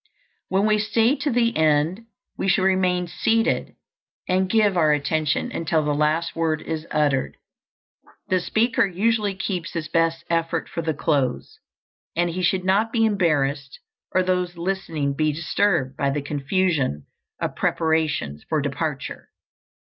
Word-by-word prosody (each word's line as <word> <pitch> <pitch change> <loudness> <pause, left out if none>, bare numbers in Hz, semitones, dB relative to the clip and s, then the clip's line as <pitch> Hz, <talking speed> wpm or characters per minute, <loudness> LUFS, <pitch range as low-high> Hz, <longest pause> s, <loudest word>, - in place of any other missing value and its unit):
When 195 +2 +2
we 215 0 +3
stay 225 +4 +2
to 295 - -1
the 235 -2 +1
end 160 +7 +1 0.3
we - - -2
should 190 0 +3
remain 185 -1 +2
seated 225 +6 0 0.5
and 185 +1 +1
give 210 -3 +3
our 155 -3 +4
attention 155 - 0
until 160 -5 0
the 150 - +1
last 155 +3 0
word 160 -2 0
is 160 0 -4
uttered. 145 -3 0 0.9
The 185 - +2
speaker 220 +6 +1
usually 205 +2 0
keeps 185 -2 -4
his 165 -2 -3
best 165 0 +1
effort 165 0 -1
for 170 - -4
the 160 -2 -2
close, 135 -5 -1 0.6
and 175 0 +1
he 180 +2 -3
should 185 +1 +1
not 205 +4 +2
be 225 -2 +2
embarrassed, 145 -9 0 0.3
or 185 - +2
those 180 -1 -1
listening 170 -6 -2
be 155 0 +1
disturbed, 160 -3 0
by 140 +1 +1
the 140 0 -2
confusion 145 - 0 0.3
of - - -3
preparations 155 - 0
for 155 - +1
departure. 145 0 -4
165 Hz, 145 wpm, -23 LUFS, 150-190 Hz, 0.9 s, our